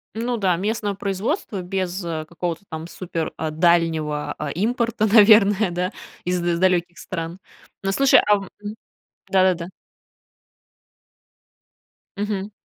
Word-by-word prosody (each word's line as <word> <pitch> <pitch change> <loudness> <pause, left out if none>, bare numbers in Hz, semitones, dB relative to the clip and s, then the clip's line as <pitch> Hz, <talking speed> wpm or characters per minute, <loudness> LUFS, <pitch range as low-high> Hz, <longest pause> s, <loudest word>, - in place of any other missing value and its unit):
Ну 235 +2 -1
да, 185 -4 +2
местного 205 +2 -2
производства, 200 - -2
без, 185 0 -3
а, 160 -2 -3
какого-то 170 +2 -4
там 160 0 -6
супер, 170 -2 -4
а, 160 -1 -3
дальнего, 155 -3 +1
а, - - -3
импорта, 230 +3 0
наверное, 210 -2 +6
да, 180 +1 -2 0.3
из 180 0 0
далеких 175 0 +1
стран. 165 -1 -5 0.4
Ну, 195 0 0
слушай 275 +6 +5
ам, 200 -2 +2
мгм, 210 +1 -6 0.5
да-да-да. 185 -3 +2 2.5
Мгм. 205 0 -3
185 Hz, 115 wpm, -22 LUFS, 170-205 Hz, 2.5 s, наверное